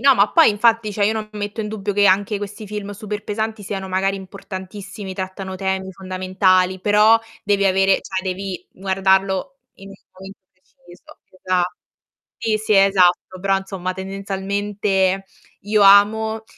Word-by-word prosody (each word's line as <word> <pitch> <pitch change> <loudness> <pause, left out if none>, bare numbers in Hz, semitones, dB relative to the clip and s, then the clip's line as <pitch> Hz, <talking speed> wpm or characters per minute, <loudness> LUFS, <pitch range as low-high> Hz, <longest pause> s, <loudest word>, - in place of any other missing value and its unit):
no, 275 +1 +6
ma 205 -1 +3
poi 330 -6 +6
infatti, 220 0 +2
cioè 205 0 0
io 220 +2 +1
non 215 -1 -4
metto 205 +1 -5
in 210 - -5
dubbio 205 -2 -4
che 205 - +3
anche 200 +2 +2
questi 205 +1 -7
film 205 0 -6
super 205 0 -6
pesanti 220 0 -3
siano 190 -1 -5
magari 190 +1 0
importantissimi, 195 +1 -8
trattano 190 0 -6
temi 190 0 -2
fondamentali, 185 0 +1
però 210 +3 +5 0.3
devi 200 -1 +1
avere 195 0 +3
cioè, 190 -1 -4
devi 190 0 -5
guardarlo 190 +6 0 0.2
in 195 - -13
un - - -11 0.2
momento 190 +1 -12
preciso, 185 0 -19
che 185 - -24
dà 185 -1 +1 0.7
sì, 215 -1 0
sì, 215 0 -1
è 195 -1 +6
esatto, 185 -1 +2
però, 195 +1 +1
insomma, 190 -1 -5
tendenzialmente 195 0 -2 0.4
io 210 +1 +1
amo 220 +3 +5
195 Hz, 155 wpm, -20 LUFS, 190-210 Hz, 0.7 s, no